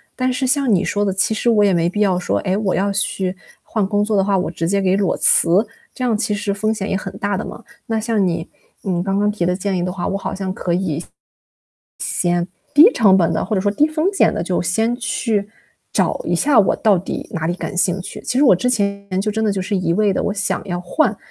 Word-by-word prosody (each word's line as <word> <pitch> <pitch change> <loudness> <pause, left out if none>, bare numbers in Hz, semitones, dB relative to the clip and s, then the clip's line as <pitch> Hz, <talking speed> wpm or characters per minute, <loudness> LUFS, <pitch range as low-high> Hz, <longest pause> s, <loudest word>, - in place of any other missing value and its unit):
但 255 0 0
是 255 +1 -1
像 270 -4 +2
你 180 - +2
说 205 - 0
的， 200 - +1
其 190 +3 0
实 220 +2 0
我 210 -3 +4
也 195 - +3
没 170 0 +2
必 205 - -4
要 190 -4 +2
说， 180 - -1
哎， 185 -1 -1
我 200 -2 0
要 200 +1 +1
去 190 -1 -1 0.3
换 215 -3 -1
工 205 +1 0
作 215 0 0
的 195 - +3
话， 195 0 +1
我 180 - -1
直 165 0 -3
接 200 +1 +1
给 190 0 +2
裸 195 -2 0
辞， 190 +6 +3 0.3
这 - - -10
样 230 -4 +1
其 220 -1 -1
实 205 -1 -2
风 215 +2 0
险 205 -2 -4
也 - - 0
很 190 - -4
大 200 -1 -1
的 - - -3
嘛。 235 - -9 0.2
那 225 -1 0
像 220 -3 0
你， 170 -2 -2 0.4
嗯， 180 -3 -1
刚 195 +2 -1
刚 205 +1 +2
提 190 -5 -2
的 180 +1 +1
建 195 0 -2
议 175 - -1
的 180 - -2
话， 180 -1 -4
我 195 - -1
好 195 - -4
像 190 -1 -3
可 175 - -2
以 170 -4 -1
先 - - -10 1.7
低 330 +11 +8
成 200 -4 +5
本 170 -3 +2
地 - - -1
或 215 - -2
者 - - +1
说 205 - +1
低 290 +9 +3
风 310 +2 -1
险 390 - +3
地 - - -2
就 180 0 -1
先 220 +7 0
去 225 -5 -1 0.4
找 - - +1
一 - - 0
下 280 -4 +3
我 195 - +1
到 210 -3 +3
底 180 - -5
哪 160 -4 -2
里 175 - 0
感 185 - -6
兴 180 +1 +1
趣。 185 - -8
其 - - -3
实 290 - +5
我 250 - +7
之 185 +8 -1
前 200 -3 -1
就 210 +2 -1
真 220 +1 -1
的 215 - +2
就 195 -1 -2
是 200 +2 -1
一 180 -3 0
味 205 +2 +2
地， - - -1
我 - - -1
想 205 -1 -2
要 175 -1 -3
换， 215 - 0
200 Hz, 280 characters per minute, -19 LUFS, 185-220 Hz, 1.7 s, 低